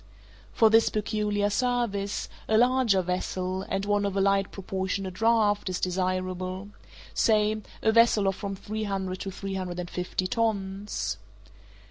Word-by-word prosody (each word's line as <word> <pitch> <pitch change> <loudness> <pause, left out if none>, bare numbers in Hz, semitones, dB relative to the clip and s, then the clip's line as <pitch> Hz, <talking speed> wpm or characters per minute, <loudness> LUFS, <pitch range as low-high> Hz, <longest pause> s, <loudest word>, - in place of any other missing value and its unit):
For 220 -1 +4
this 225 +1 +5
peculiar 210 -1 0
service, 235 -5 0 0.2
a 220 - +3
larger 240 -5 +4
vessel, 185 +1 -2
and 195 +1 -1
one 205 0 +1
of 200 -1 -1
a - - +3
light 195 0 +2
proportionate 190 0 -3
draught, 215 -1 +2
is 185 - -2
desirable—say 185 +4 -1 0.2
a 220 - +4
vessel 225 -3 +5
of 195 - +1
from 200 -1 -4
three 215 +3 -4
hundred 190 -2 -3
to 195 - -4
three 195 +1 -5
hundred 180 -2 -4
and 175 0 -5
fifty 180 +1 -2
tons. 200 - -1
200 Hz, 140 wpm, -27 LUFS, 185-215 Hz, 0.2 s, this